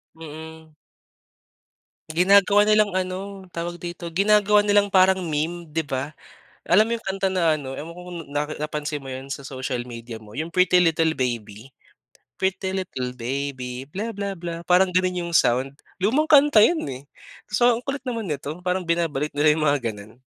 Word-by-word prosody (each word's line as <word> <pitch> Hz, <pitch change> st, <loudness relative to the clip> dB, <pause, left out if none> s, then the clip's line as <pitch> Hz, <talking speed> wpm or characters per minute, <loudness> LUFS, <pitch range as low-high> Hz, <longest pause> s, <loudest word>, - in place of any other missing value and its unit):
Mm. 160 Hz, 0 st, -11 dB, 1.4 s
Ginagawa 200 Hz, +4 st, +5 dB
nilang 215 Hz, -2 st, +4 dB
ano, 185 Hz, 0 st, -1 dB, 0.3 s
tawag 175 Hz, +1 st, -5 dB
dito, 175 Hz, 0 st, -6 dB
ginagawa 210 Hz, +2 st, +4 dB
nilang 205 Hz, -1 st, +2 dB
parang 190 Hz, -1 st, +4 dB
meme, 165 Hz, +2 st, -2 dB
'di 160 Hz, -, +1 dB
ba, 135 Hz, +3 st, -3 dB, 0.5 s
alam 185 Hz, +5 st, +6 dB
mo 225 Hz, -, -4 dB
'yong -, -, -24 dB
kanta 195 Hz, 0 st, -1 dB
na 170 Hz, -4 st, +2 dB
ano, 135 Hz, -3 st, -6 dB
ewan 165 Hz, +3 st, -8 dB
ko 180 Hz, -, -11 dB
kung 175 Hz, -, -6 dB, 0.2 s
na 145 Hz, -, +2 dB, 0.2 s
napansin 150 Hz, 0 st, -3 dB
mo 135 Hz, -, -11 dB
'yon 130 Hz, +1 st, -7 dB
sa 140 Hz, 0 st, -6 dB
social 130 Hz, -2 st, -4 dB
media 115 Hz, -1 st, -8 dB
mo, 105 Hz, -1 st, -14 dB
'yong 160 Hz, +3 st, -4 dB
Pretty 180 Hz, 0 st, +4 dB
Little 165 Hz, -1 st, +2 dB
Baby, 120 Hz, -1 st, -4 dB, 0.7 s
Pretty 190 Hz, 0 st, -1 dB
Little 130 Hz, -10 st, -4 dB
Baby 130 Hz, 0 st, -4 dB
bla 215 Hz, +7 st, -4 dB
bla 200 Hz, -2 st, -4 dB
bla 170 Hz, 0 st, -5 dB
parang 180 Hz, +1 st, +3 dB
gano'n 180 Hz, -1 st, +1 dB
'yong 170 Hz, -, -5 dB
sound, 130 Hz, -1 st, +2 dB, 0.2 s
lumang 260 Hz, +12 st, +1 dB
kanta 290 Hz, -7 st, +7 dB
'yon, 320 Hz, -, +3 dB
eh. 130 Hz, -1 st, -6 dB, 0.5 s
So, 240 Hz, +3 st, +3 dB
ang 235 Hz, -, -5 dB
kulit 275 Hz, +1 st, -5 dB
naman 230 Hz, -7 st, -3 dB
nito, 150 Hz, +4 st, -5 dB
parang 180 Hz, -1 st, -1 dB
binabalik 165 Hz, -4 st, -1 dB
nila 145 Hz, +1 st, +4 dB
yong 155 Hz, +1 st, +1 dB
mga 145 Hz, -1 st, +2 dB
gano'n. 105 Hz, +3 st, -13 dB
170 Hz, 170 wpm, -23 LUFS, 140-190 Hz, 1.4 s, kanta